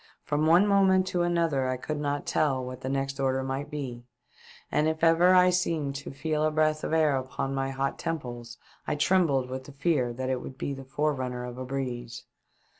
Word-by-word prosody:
From 150 +1 0
one 175 +5 +6
moment 190 -2 +4
to 175 - 0
another 165 -6 +1
I 130 - -1
could 150 +4 -4
not 145 -1 -2
tell 135 -4 +1
what 125 0 -7
the 130 - -3
next 135 0 -2
order 130 -1 +1
might 135 +2 -3
be, 130 -5 -5 0.7
and 150 +1 +2
if 160 +1 -2
ever 170 +3 +6
I 180 0 +6
seemed 165 -6 0
to 145 - -7
feel 155 +2 -2
a 155 - +3
breath 155 0 +1
of - - -2
air 155 -3 +3
upon 130 +1 -3
my 135 0 -1
hot 135 0 -2
temples, 120 -8 -5 0.3
I - - 0
trembled 150 -5 +2
with 130 +1 -6
the 145 - -11
fear 140 -4 +1
that 130 +2 -4
it 130 -1 -1
was - - -8
the 135 -1 -4
fore 150 +3 0
runner 125 -2 -4
of 125 0 -7
a 130 - -4
breeze. 125 -3 -4
140 Hz, 205 wpm, -28 LUFS, 130-160 Hz, 0.7 s, one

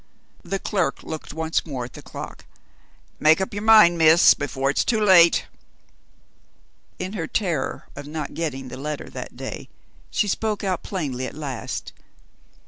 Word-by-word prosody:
The 195 - -3
clerk 185 -7 -1
looked 160 -1 -7
once 160 +1 -1
more 130 -6 -5
at 120 - -12
the - - -10
clock. - - -9 0.7
"Make 155 +2 +5
up 190 - -3
your 205 - -4
mind, 215 -6 +6
Miss, 160 +1 +7
before 140 -1 -1
it's - - +1
too 225 -2 +1
late." 185 -5 +6 1.5
In 185 - -5
her 165 -6 -3
terror 170 -10 -2
of 140 0 -8
not 150 -1 -5
getting 140 -5 -4
the 125 - -8
letter 150 +2 -5
that - - -8
day, - - -7 0.4
she 210 - 0
spoke 210 +1 -1
out 185 -3 -1
plainly 135 -9 -3
at - - -9
last. 140 -5 -5
160 Hz, 155 wpm, -23 LUFS, 140-190 Hz, 1.5 s, Miss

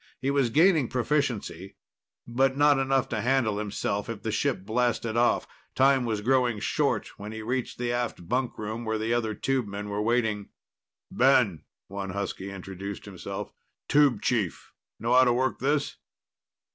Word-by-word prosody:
He 135 +2 0
was 140 -4 +2
gaining 160 0 +4
proficiency, 120 - -2 0.5
but 130 +3 +1
not 145 -1 +5
enough 135 -1 +1
to 110 -2 -2
handle 120 -4 +1
himself 105 0 -2
if 110 -3 -6
the 110 - -1
ship 110 -4 -1
blasted 115 0 0
off. 120 +1 +2 0.3
Time 135 -1 +4
was 110 -3 -1
growing 125 -1 +2
short - - 0
when 105 +1 -6
he 110 0 -6
reached 125 +2 -2
the 120 0 -1
aft 120 -8 -3
bunkroom 115 -2 -2
where 110 -1 -1
the 110 +2 -1
other 110 -3 0
tubemen 105 -5 -2
were 100 +1 -2
waiting. 110 -3 0 0.6
"Ben," 120 - +3 0.2
one 100 0 -5
husky 100 0 -4
introduced 95 +1 -7
himself. 95 -4 -7 0.3
"Tube 140 -7 +3
chief. 105 -9 -1 0.3
Know 115 +3 0
how 130 +1 +7
to 120 -2 +3
work 130 +1 0
this?" 145 +2 0
120 Hz, 155 wpm, -27 LUFS, 105-130 Hz, 0.6 s, how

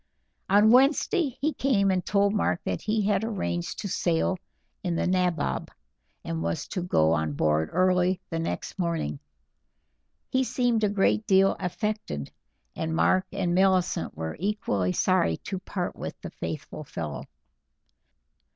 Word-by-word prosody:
On 205 +3 +6
Wednesday 275 - +3
he 305 +2 +1
came 200 -8 +2
and 185 -1 0
told 200 0 +2
Mark 205 -4 +1
that - - -2
he 215 0 0
had 200 0 +1
arranged 85 - -2
to - - -3
sail 175 0 0 0.4
in 175 -3 -1
the - - 0
Nabob, 180 -4 0 0.6
and 80 -1 -3
was 85 0 -2
to 185 - -2
go 80 - +3
on 80 -2 0
board 75 +2 +1
early 185 +1 +2
the 165 - -1
next 165 +3 -4
morning. 165 - -1 1.1
He 260 0 +2
seemed 245 -3 +1
a 210 - +3
great 205 +2 +1
deal 195 0 +5
affected, 190 - -3 0.4
and 160 0 -2
Mark 185 +3 +3
and 185 -3 -1
Millicent 185 -1 +2
were 80 0 -4
equally 165 - 0
sorry 175 - +2
to 190 -1 -5
part 180 -1 -4
with - - -7
the - - -7
faithful - - -6
fellow. - - -5
185 Hz, 145 wpm, -27 LUFS, 160-205 Hz, 1.1 s, On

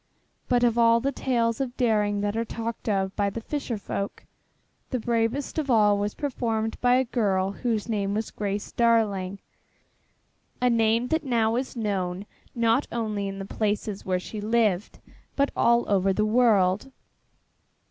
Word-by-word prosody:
But 245 -1 +3
of 240 -1 +3
all 230 0 +5
the 275 +4 -1
tales 235 -3 0
of 255 -2 -4
daring 210 -4 +1
that 205 +1 -1
are 230 - 0
talked 230 0 -5
of 195 -2 0
by 200 -1 +1
the 215 - -5
fisher 245 -1 -4
folk, 200 0 -5 0.7
the 255 - -1
bravest 235 +6 -1
of 290 -3 -3
all 210 -4 +5
was 205 0 -2
performed 225 -6 -2
by 245 0 +4
a 260 - +3
girl 195 -6 0
whose 225 0 -2
name 205 -3 -1
was 220 +1 -3
Grace 205 0 -3
Darling, 210 -5 +1 1.2
a 250 0 +3
name 230 +1 +2
that 320 -1 +1
now 230 -4 +1
is 255 +2 -3
known 195 -4 -2 0.3
not 235 +3 +2
only 215 -4 -2
in 195 0 -5
the 195 - -5
places 210 0 -2
where 185 -1 0
she 210 +3 -7
lived 215 -3 +1 0.4
but 280 0 +1
all 235 0 +3
over 195 -1 +2
the 210 +2 +1
world. 215 -1 +3
225 Hz, 160 wpm, -26 LUFS, 205-235 Hz, 1.2 s, all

